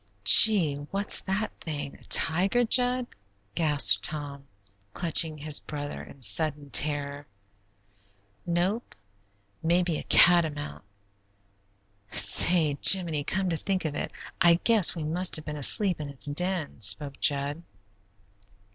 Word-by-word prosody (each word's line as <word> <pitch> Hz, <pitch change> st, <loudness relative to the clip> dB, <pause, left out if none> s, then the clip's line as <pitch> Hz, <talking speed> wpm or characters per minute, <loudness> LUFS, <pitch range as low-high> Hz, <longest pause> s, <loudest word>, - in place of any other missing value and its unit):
"Gee, 165 Hz, -, +5 dB
what's 200 Hz, +1 st, 0 dB
that 195 Hz, +3 st, -4 dB
thing? 145 Hz, -3 st, -7 dB
A -, -, -20 dB
tiger, 190 Hz, +10 st, +1 dB
Jud?" 250 Hz, +1 st, 0 dB, 0.5 s
gasped 150 Hz, -4 st, 0 dB
Tom, 145 Hz, -2 st, -5 dB, 0.5 s
clutching 160 Hz, -2 st, +1 dB
his 150 Hz, 0 st, +2 dB
brother 145 Hz, -1 st, -9 dB
in 135 Hz, -, -13 dB
sudden 145 Hz, +6 st, 0 dB
terror. 145 Hz, -1 st, -1 dB, 1.2 s
"Nope; 180 Hz, +7 st, -4 dB, 0.7 s
maybe 170 Hz, -1 st, -1 dB
a -, -, -9 dB
catamount. 150 Hz, -, +1 dB, 1.3 s
Say, 150 Hz, -, +4 dB
Jiminy, 170 Hz, -6 st, +4 dB
come 190 Hz, +6 st, -3 dB
to 165 Hz, -, -3 dB
think 190 Hz, +1 st, -5 dB
of 155 Hz, -, -4 dB
it, -, -, -6 dB, 0.3 s
I 170 Hz, -2 st, +4 dB
guess 220 Hz, -7 st, +4 dB
we 165 Hz, -, -7 dB
must 175 Hz, +4 st, +1 dB
have 155 Hz, -, -2 dB
been 150 Hz, -, -7 dB
asleep 175 Hz, +5 st, +1 dB
in 145 Hz, -, -8 dB
its 140 Hz, -2 st, -5 dB
den," 160 Hz, -2 st, -3 dB
spoke 135 Hz, +7 st, -1 dB
Jud. 145 Hz, +2 st, 0 dB
155 Hz, 120 wpm, -25 LUFS, 145-180 Hz, 1.3 s, Gee